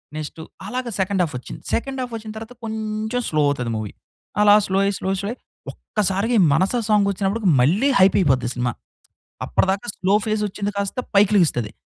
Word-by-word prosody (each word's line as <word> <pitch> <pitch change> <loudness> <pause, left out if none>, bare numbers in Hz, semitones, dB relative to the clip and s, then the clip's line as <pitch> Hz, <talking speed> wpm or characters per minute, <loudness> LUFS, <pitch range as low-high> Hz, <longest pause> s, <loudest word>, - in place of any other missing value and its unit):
Next 155 +1 -6 0.3
అలాగే 250 +2 -3
second 190 0 0
half 160 - -3
ఒచ్చింది. - - -10
Second 265 +2 -2
half 245 -2 -5
ఒచ్చిన 215 -1 -8
తర్వాత 225 +2 -8
కొంచెం 220 +1 -3
స్లో 155 -1 +1
అవుతది 125 -5 -2
మూవీ. 110 -2 -5 0.5
అలా 205 0 +7
స్లో 190 - -1
అయ్యి, 200 +1 +1
స్లో - - -5
అయ్యి, 195 - -1
స్లో 200 - -3
అయ్యి 245 - -9 0.3
ఒక్కసారిగా 205 +3 -1
ఈ - - +6
'మనసా' 190 - +2
సాంగ్ 210 -2 +4
వచ్చినప్పటికి 195 +1 0
మళ్ళీ 190 - +3
హైప్ 190 0 +5
అయిపోద్ది 130 -8 +2
సినిమా. 125 -1 -1 0.7
అప్పటిదాకా 195 +4 0
స్లో 190 +1 +1
ఫేస్ 215 -1 0
వచ్చింది 205 +1 -4
కాస్త 200 +4 -2 0.2
పైకిలెగుస్తది. 185 - +3
200 Hz, 175 wpm, -21 LUFS, 180-220 Hz, 0.7 s, అలా